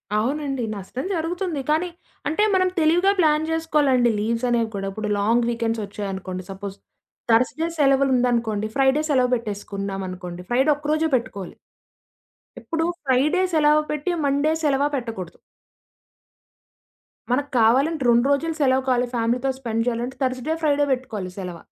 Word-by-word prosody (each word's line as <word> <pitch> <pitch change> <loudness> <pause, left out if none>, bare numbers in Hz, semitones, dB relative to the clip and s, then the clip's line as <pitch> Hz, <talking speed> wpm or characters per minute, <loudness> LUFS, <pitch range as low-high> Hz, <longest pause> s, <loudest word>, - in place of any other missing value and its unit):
అవునండి. 270 +3 -1
నష్టం 205 +7 -6
జరుగుతుంది. 335 -2 -2
కానీ, 320 +4 +1 0.4
అంటే 320 +7 +1
మనం 370 -1 +3
తెలివిగా 345 +5 +4
ప్లాన్ 310 -1 +3
జేసుకోవాలండి 290 -7 +2
లీవ్స్ 230 +3 -1
అనేవి 230 -2 +1
కూడా. 195 0 -3
ఇప్పుడు 210 +1 -4
long 230 +3 +2
weekends 230 -1 -1
ఒచ్చాయనుకోండి, 190 -2 -5
suppose 195 0 -7 0.5
Thursday 255 +8 +2
సెలవులుందనుకోండి, 250 -6 +2
Friday 270 +2 +3
సెలవు 255 -3 +2
బెట్టేసుకున్నామనుకోండి, 195 -4 -5
ఫ్రైడే 265 +5 +3
ఒక్కరోజే 310 +2 0
పెట్టుకోలి. 210 -7 -4 1.0
ఎప్పుడు 325 -1 -2 0.2
ఫ్రైడే 280 +8 +2
సెలవు 305 -1 +4
పెట్టి 300 +4 -1
మండే 285 +2 +2
సెలవ 280 -2 +2
పెట్టకూడదు. 225 -9 -5 1.9
మనకు 285 +3 0
కావాలంటే 270 +7 +3
2 235 +1 +4
రోజులు 320 +3 0
సెలవు 260 -1 +3
కావాలి 250 -1 +2
ఫ్యామిలీ‌తో 240 +3 0
స్పెండ్ 230 -2 -2
జేయాలంటే, 245 +2 -2
థర్స్డే 255 +4 -1
ఫ్రైడే 290 -1 +2
బెట్టుకోవాలి 225 -8 -3
సెలవ. 180 -3 -5
255 Hz, 125 wpm, -23 LUFS, 225-300 Hz, 1.9 s, తెలివిగా